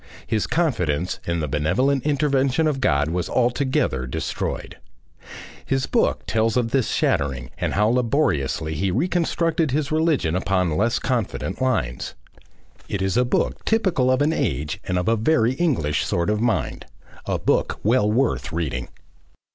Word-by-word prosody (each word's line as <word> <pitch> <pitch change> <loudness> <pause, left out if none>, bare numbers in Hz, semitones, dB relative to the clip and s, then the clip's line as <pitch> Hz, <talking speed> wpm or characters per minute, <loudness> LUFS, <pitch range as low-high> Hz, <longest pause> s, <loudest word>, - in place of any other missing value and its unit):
His 110 -2 -1
confidence 90 - 0
in 85 -1 0
the 75 - -2
benevolent 125 - +1
intervention 140 0 +2
of 145 -4 0
God 70 - +2
was 85 +1 -2
altogether 120 - 0
destroyed. 60 - -4 0.9
His 135 0 0
book - - +1
tells 115 +1 +1
of 115 -2 0
this 130 -3 +1
shattering, 65 -3 0
and 85 -4 -1
how 105 +2 +3
labouriously 110 - 0
he 95 +5 -1
reconstructed 165 - 0
his 140 +2 -1
religion 155 - +1
upon 90 -3 0
less 115 +6 +1
confident 115 -4 -2
lines. 110 - -1 0.7
It 100 -1 -2
is 95 0 0
a 125 - +4
book 125 - -1
typical 190 - +2
of 130 +2 +3
an 155 +2 +2
age 75 - -2
and 90 - -1
of 90 - -1
a 115 - +4
very 115 +1 +2
English 110 - 0
sort 85 +4 0
of 105 0 0
mind, 115 -5 -1 0.4
a - - 0
book - - 0
well 105 -1 +3
worth 120 -3 0
reading. 75 -7 -3
115 Hz, 150 wpm, -23 LUFS, 85-135 Hz, 0.9 s, a